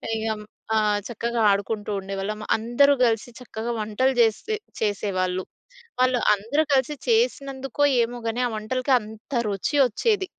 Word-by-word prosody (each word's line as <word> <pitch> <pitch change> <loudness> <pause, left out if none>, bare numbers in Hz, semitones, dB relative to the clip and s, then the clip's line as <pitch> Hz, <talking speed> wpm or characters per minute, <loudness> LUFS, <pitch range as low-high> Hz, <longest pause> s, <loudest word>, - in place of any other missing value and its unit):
ఇగ 220 - -3 0.5
ఆ! - - +4 0.3
చక్కగా 235 +1 -2
ఆడుకుంటూ 205 +1 -2
ఉండేవాళ్ళం. 195 +2 -4 0.2
అందరూ 240 +6 +4
కలిసి 225 +1 0
చక్కగా 235 -1 -5
వంటలు 220 +5 +1
జేసి 235 - +2 0.3
చేసేవాళ్ళు. 185 -3 -1 0.6
వాళ్ళందరూ 250 +2 +2
కలిసి 270 +2 +2
చేసినందు‌కొ 280 - 0 0.2
ఏమో 240 +1 -4
గాని, 225 +2 -2
ఆ - - -4
వంటలకి 255 +5 -1
అంత 220 +5 -11 0.2
రుచి 200 +9 -1
వచ్చేది. 390 - 0
230 Hz, 120 wpm, -24 LUFS, 210-265 Hz, 0.6 s, ఆ